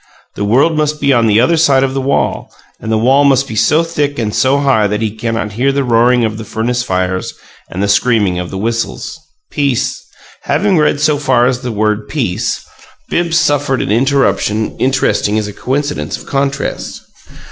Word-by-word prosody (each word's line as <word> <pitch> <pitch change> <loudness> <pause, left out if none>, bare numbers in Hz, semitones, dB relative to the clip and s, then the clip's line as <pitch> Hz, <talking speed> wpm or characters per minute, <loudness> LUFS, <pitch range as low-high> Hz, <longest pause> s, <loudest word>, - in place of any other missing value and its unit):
The - - -4
world 135 +10 +3
must 150 0 -1
be 140 - +2
on 115 -2 +3
the 105 0 +3
other 145 +8 +3
side 140 -5 +3
of 135 -1 -1
the 135 - -1
wall, 140 +1 -1 0.3
and 110 - -5
the 110 - +2
wall 130 +6 +3
must 135 -1 +3
be 110 - -6
so 155 +8 +3
thick 150 -4 -2
and 110 -3 -2
so 135 +4 +2
high 135 -7 +2
that 105 +1 -2
he 110 -1 -3
cannot 115 -1 -3
hear 125 +6 0
the 140 0 0
roaring 120 0 +3
of 110 0 -4
the - - -6
furnace 120 +3 -2
fires 95 -4 -2 0.3
and 95 +2 -3
the - - +1
screaming 100 -3 +2
of 90 - -5
the 95 - -6
whistles. 115 +7 -3 0.3
Peace 140 -5 -1 0.4
Having 195 -4 +1
read 150 -1 +2
so 150 0 +2
far 130 -4 +2
as 125 -1 0
the 125 -2 -4
word 105 0 -1
"peace," 115 -6 -2 0.5
Bibbs 170 -1 +1
suffered 145 -4 +1
an - - -2
interruption 120 -3 +1
interesting 130 -5 +1
as 105 -1 -1
a 105 - -7
coincidence 145 +6 -3
of - - -13
contrast. 140 0 -3
125 Hz, 190 wpm, -14 LUFS, 110-140 Hz, 0.5 s, world